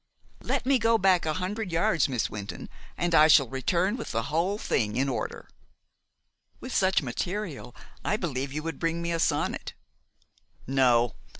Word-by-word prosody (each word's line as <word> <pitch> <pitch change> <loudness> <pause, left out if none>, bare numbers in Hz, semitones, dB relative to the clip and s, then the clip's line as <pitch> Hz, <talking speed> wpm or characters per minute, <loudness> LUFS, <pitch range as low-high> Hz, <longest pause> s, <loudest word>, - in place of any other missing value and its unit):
Let - - -2
me 265 -1 +3
go 230 0 +3
back 185 -4 +3
a 155 - +1
hundred 190 +2 -3
yards, 165 -3 +2
Miss 125 -4 0
Wynton, 100 -2 -7 0.3
and 175 0 -1
I 155 -1 +7
shall 140 -4 +6
return 170 - 0
with 230 - -6
the 115 +1 -1
whole 180 +6 +1
thing 105 - -1
in 135 +3 +1
order." 130 - -4 1.1
"With 255 - -7
such 190 -3 +2
material 155 - -4 0.3
I 210 - 0
believe 140 -8 -3
you 150 +2 -4
would 165 -3 -5
bring 165 0 -1
me 170 - -2
a 165 - -1
sonnet." - - -1 0.9
"No. 125 -3 +3
165 Hz, 165 wpm, -27 LUFS, 135-190 Hz, 1.1 s, I